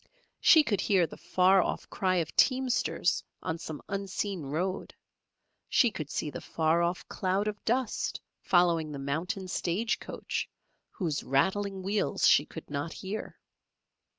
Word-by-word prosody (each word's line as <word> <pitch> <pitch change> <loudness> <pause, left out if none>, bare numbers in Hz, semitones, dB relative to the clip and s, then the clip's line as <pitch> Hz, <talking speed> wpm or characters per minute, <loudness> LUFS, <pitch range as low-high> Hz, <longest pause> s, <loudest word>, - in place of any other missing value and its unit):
She 315 -2 +7
could 205 -8 0
hear 190 -4 +3
the - - -9
far 185 +1 +4
off - - -3
cry 185 -1 +1
of 165 -4 -1
teamsters 255 -1 +2 0.2
on 160 +1 -3
some 155 -2 -7
unseen 195 -1 -3
road; 165 +7 -3 0.7
she 240 -4 +4
could 155 -6 -6
see 150 - -3
the - - -7
far 160 +1 +1
off 170 +1 -1
cloud 190 +2 -1
of 210 -1 -4
dust 245 0 0 0.2
following 170 -4 +3
the 145 - -5
mountain 170 +9 -3
stage 185 +5 -1
coach, - - -4 0.4
whose 165 -8 -3
rattling 190 +7 0
wheels 200 0 +1
she 145 - +5
could 160 - -9
not 145 +2 -4
hear. 200 +3 -6
185 Hz, 145 wpm, -29 LUFS, 160-200 Hz, 0.7 s, She